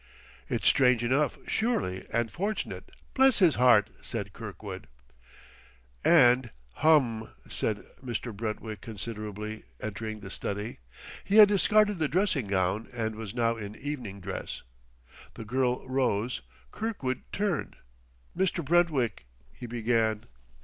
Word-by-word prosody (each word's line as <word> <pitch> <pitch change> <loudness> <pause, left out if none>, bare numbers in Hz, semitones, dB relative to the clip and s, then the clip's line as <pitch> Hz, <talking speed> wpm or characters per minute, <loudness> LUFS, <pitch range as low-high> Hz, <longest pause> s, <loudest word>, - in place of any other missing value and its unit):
"It's - - -2
strange 125 -3 +4
enough, 135 +5 +1
surely 220 - -1
and 115 -1 0
fortunate. 205 - -3 0.2
Bless 265 -2 +5
his 175 -6 +5
heart!" 120 -5 +5
said 105 -3 -5
Kirkwood. 100 -3 -8 1.2
And, 125 -6 +5 0.3
"Hum!" 130 -8 +3 0.2
said - - -2 0.2
Mr. 120 -2 -4
Brentwick 110 -1 -4
considerately, 105 0 -6 0.2
entering 110 0 -5
the 95 -2 -8
study. 105 - -4 0.4
He 200 - -1
had 210 -2 +10
discarded 210 -1 +3
the 155 - +2
dressing 155 - +1
gown 95 +2 0
and 110 -2 -2
was 110 -1 -7
now 115 -1 +1
in 105 -1 -7
evening 120 -9 -6
dress. 95 +1 -5 0.7
The 115 - -7
girl 125 +2 0
rose. 125 -3 0 0.3
Kirkwood 200 - -3
turned. 200 -4 -1 0.6
"Mr. 180 -3 0
Brentwick 150 - +2
" - - -31
he 120 - -6
began. 115 -2 0
120 Hz, 120 wpm, -29 LUFS, 110-150 Hz, 1.2 s, had